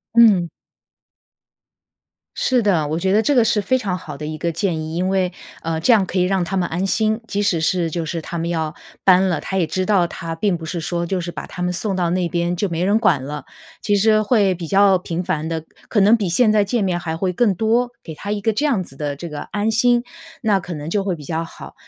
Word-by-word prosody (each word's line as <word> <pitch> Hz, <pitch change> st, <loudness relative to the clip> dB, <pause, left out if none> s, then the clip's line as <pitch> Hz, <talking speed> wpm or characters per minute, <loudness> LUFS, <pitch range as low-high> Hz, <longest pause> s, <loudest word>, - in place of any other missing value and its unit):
嗯。 205 Hz, -7 st, +6 dB, 1.9 s
是 255 Hz, -2 st, +2 dB
的， 180 Hz, -8 st, +2 dB
我 160 Hz, +2 st, -1 dB
觉 190 Hz, +2 st, 0 dB
得 210 Hz, -, +5 dB
这 290 Hz, -, +2 dB
个 245 Hz, -4 st, +5 dB
是 220 Hz, -1 st, +2 dB
非 260 Hz, +5 st, +1 dB
常 190 Hz, -6 st, -2 dB
好 155 Hz, -5 st, -8 dB
的 145 Hz, -, -8 dB
一 155 Hz, 0 st, -5 dB
个 170 Hz, +1 st, -1 dB
建 170 Hz, -1 st, -1 dB
议。 155 Hz, +1 st, -5 dB
因 180 Hz, +2 st, 0 dB
为， 190 Hz, -2 st, +1 dB, 0.3 s
呃， 160 Hz, 0 st, -1 dB
这 205 Hz, -, +4 dB
样 215 Hz, -5 st, +5 dB
可 185 Hz, +1 st, -2 dB
以 -, -, +4 dB
让 185 Hz, 0 st, +1 dB
他 185 Hz, +3 st, -3 dB
们 180 Hz, -2 st, 0 dB
安 175 Hz, +4 st, -1 dB
心， 215 Hz, +2 st, +1 dB
即 205 Hz, -1 st, -1 dB
使 190 Hz, -5 st, +1 dB
是 170 Hz, +1 st, +1 dB
就 165 Hz, 0 st, -3 dB
是 165 Hz, +1 st, -3 dB
他 170 Hz, +2 st, -6 dB
们 165 Hz, 0 st, -2 dB
要 160 Hz, -2 st, -2 dB, 0.3 s
搬 190 Hz, 0 st, +5 dB
了， 175 Hz, -3 st, -1 dB
他 190 Hz, -, -3 dB
也 180 Hz, -, +2 dB
知 185 Hz, +4 st, -2 dB
道 195 Hz, -4 st, +3 dB
他 165 Hz, -1 st, -5 dB
并 190 Hz, +2 st, +1 dB
不 165 Hz, -, -8 dB
是 170 Hz, +2 st, -4 dB
说 170 Hz, +1 st, -2 dB
就 190 Hz, +1 st, -1 dB
是 175 Hz, 0 st, -4 dB
把 -, -, -7 dB
他 180 Hz, -, -6 dB
们 180 Hz, 0 st, 0 dB
送 195 Hz, +2 st, -2 dB
到 175 Hz, -2 st, 0 dB
那 180 Hz, -1 st, 0 dB
边 175 Hz, 0 st, -1 dB
就 195 Hz, +3 st, -1 dB
没 170 Hz, +1 st, -1 dB
人 205 Hz, +3 st, +3 dB
管 170 Hz, -, +2 dB
了， 145 Hz, +1 st, -6 dB, 0.4 s
其 205 Hz, -, +1 dB
实 215 Hz, +1 st, +4 dB
会 205 Hz, -3 st, +3 dB
比 170 Hz, -2 st, -6 dB
较 195 Hz, +1 st, +4 dB
频 175 Hz, 0 st, -4 dB
繁 160 Hz, -2 st, -2 dB
地 160 Hz, -1 st, -3 dB, 0.2 s
可 215 Hz, -, +2 dB
能 210 Hz, +4 st, +6 dB
比 205 Hz, -5 st, -1 dB
现 215 Hz, +6 st, +4 dB
在 210 Hz, -1 st, +4 dB
见 210 Hz, +2 st, 0 dB
面 180 Hz, -2 st, 0 dB
还 160 Hz, -2 st, -4 dB
会 185 Hz, +1 st, -1 dB
更 205 Hz, 0 st, +2 dB
多， 230 Hz, +5 st, +1 dB
给 160 Hz, -, -7 dB
他 200 Hz, +6 st, -6 dB
一 210 Hz, -, -1 dB
个 220 Hz, +2 st, 0 dB
这 295 Hz, +8 st, +1 dB
样 230 Hz, -10 st, +1 dB
子 135 Hz, -, -15 dB
的 145 Hz, 0 st, -3 dB
这 170 Hz, +4 st, -7 dB
个 150 Hz, -1 st, -6 dB
安 210 Hz, +2 st, -2 dB
心， 240 Hz, +2 st, +3 dB, 0.4 s
那 210 Hz, -5 st, +2 dB
可 175 Hz, -2 st, -6 dB
能 150 Hz, +2 st, -6 dB
就 205 Hz, 0 st, +1 dB
会 190 Hz, -2 st, -1 dB
比 150 Hz, -, -11 dB
较 160 Hz, +3 st, -2 dB
好。 165 Hz, -, -11 dB
185 Hz, 275 characters per minute, -20 LUFS, 165-205 Hz, 1.9 s, 嗯